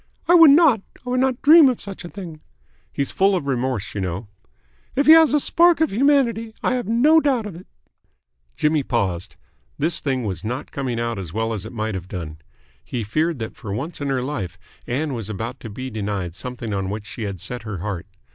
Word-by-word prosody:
"I 345 - +5
would 330 -3 +9
not. 280 - +6 0.2
I 250 - -3
would 255 - +1
not 260 -1 0
dream 310 -1 +8
of 250 - -2
such 195 -2 -8
a 175 - -8
thing." 170 -6 -9 0.5
"He's 140 - -2
full 195 +1 +3
of 175 - -2
remorse, 130 -5 -2
you 100 - -3
know." 95 +3 -3 0.7
"If 280 - +2
he 315 - +8
has 320 -1 +8
a 295 - +3
spark 340 +2 +4
of 320 - +2
humanity, 235 -2 +2
I - - +2
have 245 -5 -2
no 275 +8 +5
doubt 265 -7 +1
of 205 - -6
it." 180 - -12 0.9
Jimmy 150 0 +2
paused. 100 -8 -2 0.4
This 160 +4 0
thing 130 -3 -1
was 100 -3 -4
not 125 +6 -4
coming 130 -4 -3
out 115 -3 -2
as 85 -5 -7
well 110 +1 -1
as 105 -1 -5
it - - -10
might 110 -2 -3
have 95 -2 -5
done. 80 -5 -7 0.4
He 120 - -4
feared 155 +9 0
that 110 -2 -6
for 100 - -8
once 145 - -5
in 140 - -2
her 130 -2 0
life 105 -11 -4 0.3
Ann 140 +4 -1
was 115 -4 -5
about 115 +5 -5
to 115 - -8
be 130 +5 -6
denied 100 -5 -3
something 120 +1 -5
on 95 -1 -2
which 105 +1 -5
she 115 - -8
had 100 -3 -5
set 125 +8 -5
her 110 -3 -6
heart. 90 -1 -5
130 Hz, 220 wpm, -22 LUFS, -, 0.9 s, would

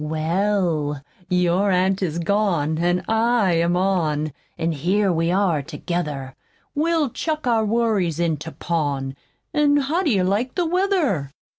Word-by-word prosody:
"Well, 160 -1 0 0.3
your 180 +2 +2
aunt 190 +1 +2
is 170 -4 -1
gone, 170 -4 0
an' 175 +1 +1
I'm 205 -7 +2
on, 155 -6 0 0.2
An' 165 +1 0
here 185 +6 +1
we 165 0 0
are 180 -5 +2
together. 145 -3 -4 0.4
We'll 315 -2 +1
chuck 310 +1 -3
our 230 -3 +2
worries 210 -7 +1
into 160 -2 -1
pawn, 145 -6 -2 0.4
An' 290 -1 +3
how 290 +6 0
do 345 - +1
you 195 -7 +2
like 210 +7 0
the 355 - +1
weather?" 335 - +1
180 Hz, 135 wpm, -22 LUFS, 160-225 Hz, 0.4 s, An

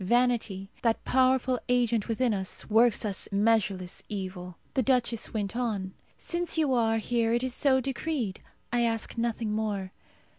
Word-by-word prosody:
Vanity, 230 -3 +1
that 230 -2 +1
powerful 255 -1 +3
agent 240 -3 +2
within 230 +1 +1
us, 190 -2 -3
works 225 +1 +4
us 200 -3 -1
measureless 200 -3 +1
evil. 185 -3 -5 0.2
The 265 - +2
duchess 240 -3 +1
went 205 -1 -3
on, 210 -6 -2 0.2
"Since 345 -1 -1
you 300 -4 +2
are 225 -2 +2
here, 230 0 +1
it 240 +1 +1
is 260 -1 -2
so 265 0 +3
decreed. 260 -5 -3 0.3
I 240 - +3
ask 225 -1 0
nothing 230 -2 -1
more. 205 -3 -2
230 Hz, 150 wpm, -28 LUFS, 205-250 Hz, 0.3 s, works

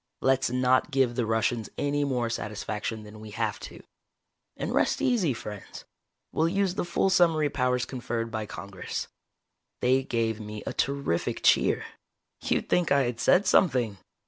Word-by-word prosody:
Let's 135 -1 +3
not 125 +2 +2
give 135 -4 +2
the 120 -2 -1
Russians 115 0 0
any 145 0 0
more 125 -4 0
satisfaction 110 0 -4
than 105 0 -11
we 110 0 -9
have 110 -3 -1
to. - - -10 0.7
And - - -3
rest - - +2
easy, 215 - +2
friends. 105 -4 -8 0.5
We'll 160 - +2
use 195 0 +1
the 180 - -2
full 175 +2 +1
summary 165 -5 +3
powers 125 -2 +1
conferred 120 -3 -4
by 110 -1 -3
Congress." 100 -2 -6 0.7
They 130 +2 +3
gave 115 -3 -1
me 105 0 -7
a - - -3
terrific 140 -11 -1
cheer. - - +4 0.6
You'd - - 0
think 180 -2 +1
I 140 - +5
had 120 -1 -3
said 180 - +4
something. 125 - +3
125 Hz, 155 wpm, -27 LUFS, 110-145 Hz, 0.7 s, I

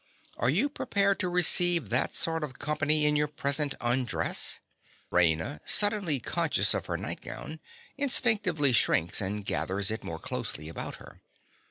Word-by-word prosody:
Are 115 - 0
you 190 - +2
prepared 200 -8 0
to 180 - -1
receive 175 - +3
that 120 +3 0
sort 165 -1 0
of 130 -4 -7
company 150 0 +1
in 150 0 +3
your 150 0 +1
present 145 0 0
undress? 120 0 -1 0.5
(_Raina, 80 -3 +1
suddenly 205 -9 +2
conscious - - +1
of - - -3
her - - -2
nightgown, 155 +1 -7 0.4
instinctively 215 - +2
shrinks 85 -6 +2
and 100 +1 -3
gathers 100 +2 -1
it 110 - -4
more 80 - -6
closely 75 -1 -5
about 80 - -6
her. - - -15
150 Hz, 145 wpm, -28 LUFS, 110-175 Hz, 0.5 s, receive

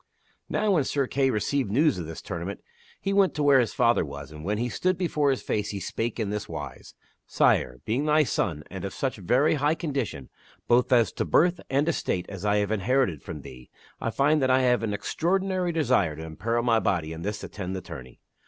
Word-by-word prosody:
Now 215 - +1
when 165 -7 +3
Sir 140 0 0
Kay 135 +1 +1
received 130 +2 0
news 140 - +2
of 85 - -5
this 80 - -8
tournament 95 0 -5 0.4
he 195 - -1
went 195 -2 +3
to 150 - 0
where 140 -2 +6
his 120 -4 0
father 120 0 +3
was, 70 -1 -8
and 75 0 -10
when 105 +4 -1
he 120 +3 -1
stood 185 +9 0
before 150 -5 +1
his 135 - 0
face 105 -1 -1
he 100 - -4
spake 115 +4 -3
in 105 -3 -1
this 105 0 -4
wise - - -8
> - - -36
" - - -52
Sire, 65 +1 +2
being 125 +7 0
thy 155 0 +4
son 80 - -1
and 95 -1 -6
of 100 - -5
such 135 -5 -2
very 125 - +2
high 150 +1 +1
condition 135 - -3 0.4
both 120 +2 +3
as 120 -3 +4
to - - -2
birth 175 +1 +3
and 140 +3 +1
estate 95 - -1
as 100 -2 -7
I 105 0 +3
have 105 0 +1
inherited 110 - +1
from 75 - -7
thee, 65 -1 -12 0.3
I - - -2
find 140 +7 +2
that 130 - +2
I 130 0 +4
have 125 -2 +3
an 115 -2 -1
extraordinary 185 - 0
desire 125 - +2
to 80 +1 -7
imperil 115 +9 -2
my 115 -2 +3
body 80 -7 -1
in 80 - -8
this 105 +3 -4
attend 95 -2 -5
the 95 - -4
tourney. 65 -9 -10
115 Hz, 225 wpm, -26 LUFS, 95-145 Hz, 0.4 s, where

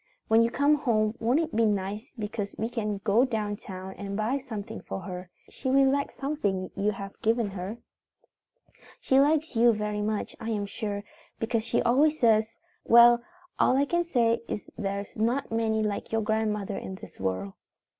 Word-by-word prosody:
When 225 +1 +6
you 230 - +3
come 285 +5 +3
home 220 -6 +1
won't 240 +6 +2
it 320 -5 -4
be 230 - +3
nice 210 +4 -1
because 210 -1 -4
we 225 +2 -2
can 215 -4 -2
go 220 +4 +4
down 215 -5 -1
town 190 -1 -8
and 200 0 -4
buy 230 +6 0
something 220 -7 -7
for 195 - -6
her. 180 -2 -7 0.2
She 260 - -5
will 270 0 +5
like 280 0 0
something 205 -11 -2
you 200 +1 +1
have 195 0 -9
given 225 -2 +1
her. 190 +4 -5 1.2
"She 265 - +3
likes 300 0 +2
you 235 +1 +6
very 210 -1 -2
much, 210 0 -2
I 225 - -5
am 210 -2 -1
sure, 205 -1 -4 0.3
because 225 0 -1
she 230 - 0
always 300 +6 +3
says, 220 -1 +3 0.3
'Well, 235 0 +7 0.4
all 255 - +4
I 280 - +3
can 345 +4 +1
say 235 -8 +2
is 210 - -5
there's 200 -1 -4
not 235 +5 0
many 220 -1 +1
like 210 -1 -3
your 225 0 +1
grandmother 210 -2 -1
in 190 - -7
this - - -12
world.' 95 0 -2
220 Hz, 180 wpm, -27 LUFS, 205-240 Hz, 1.2 s, Well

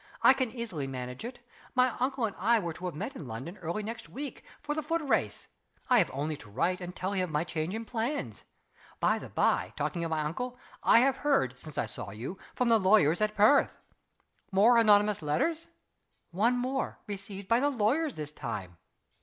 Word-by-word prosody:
I - - +9
can 260 -2 -1
easily 220 - -4
manage 125 +1 -6
it. 245 +1 -6 0.4
My 255 -1 +3
uncle 260 -1 0
and 205 - -4
I 230 +5 +4
were 170 -6 -2
to 180 - -8
have 175 - -5
met - - -5
in 145 - -7
London, 130 - -7
early 175 +6 -3
next 225 +2 -6
week, 280 +1 -7 0.2
for 295 0 -3
the 310 - -2
foot 325 +2 -1
race. 280 - 0 0.4
I 245 - +7
have 180 - +2
only 150 +3 -2
to 105 - -14
write 180 - 0
and 180 0 -6
tell 185 +2 -2
him 190 -2 0
of - - -9
my 150 0 0
change 170 +2 -3
of 225 +1 -4
plans. 240 +6 -3 0.6
By - - +2
the - - -9
by, - - +1
talking 170 -2 -2
of 165 - -2
my 160 -1 0
uncle, 245 +12 -3 0.2
I 230 - +6
have 270 +1 +3
heard, 200 - +1
since 150 0 -10
I - - +1
saw - - -8
you, 120 - -7 0.2
from 250 -1 +1
the 225 -1 +5
lawyers 190 -4 +4
at 215 0 +1
Perth." 215 +8 +4 0.7
"More 220 +5 +6
anonymous 210 -3 +4
letters?" 235 - 0 0.6
"One 225 +8 +2
more 260 +2 -2
received 200 -1 -7
by 230 +3 +4
the 285 +2 +2
lawyers 275 +5 +1
this 150 -1 -5
time. 105 - -6
205 Hz, 205 wpm, -30 LUFS, 160-245 Hz, 0.7 s, I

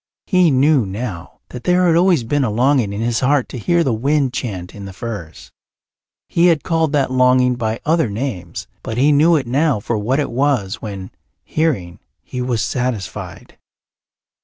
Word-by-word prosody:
He 185 -4 +3
knew 140 0 +3
now 100 -2 -6
that 125 - -8
there 180 0 +3
had 170 -2 +4
always 175 -6 +3
been 145 +5 0
a 125 - 0
longing 120 0 +2
in 100 +2 -4
his 115 0 0
heart 135 0 +2
to 125 - -6
hear 170 +9 +2
the 130 - 0
wind 135 +3 0
chant 95 -9 -5
in 100 -1 -9
the 95 - -8
firs. 100 -8 -8 0.8
He 170 +1 +3
had 165 -3 +2
called 165 -3 0
that 140 -3 +1
longing 125 0 +3
by 115 -2 -2
other 160 -5 +2
names, 100 -6 -5 0.2
but 110 - -5
he 140 +4 +4
knew 155 +4 +4
it 140 -4 0
now 135 +1 +1
for 110 +2 -2
what 125 +7 0
it 145 - -2
was 125 -7 0
when, 100 -3 -7 0.3
hearing, 120 - -2 0.2
he 125 - -5
was 125 -3 -1
satisfied. 125 -6 -4
125 Hz, 180 wpm, -18 LUFS, 110-150 Hz, 0.8 s, had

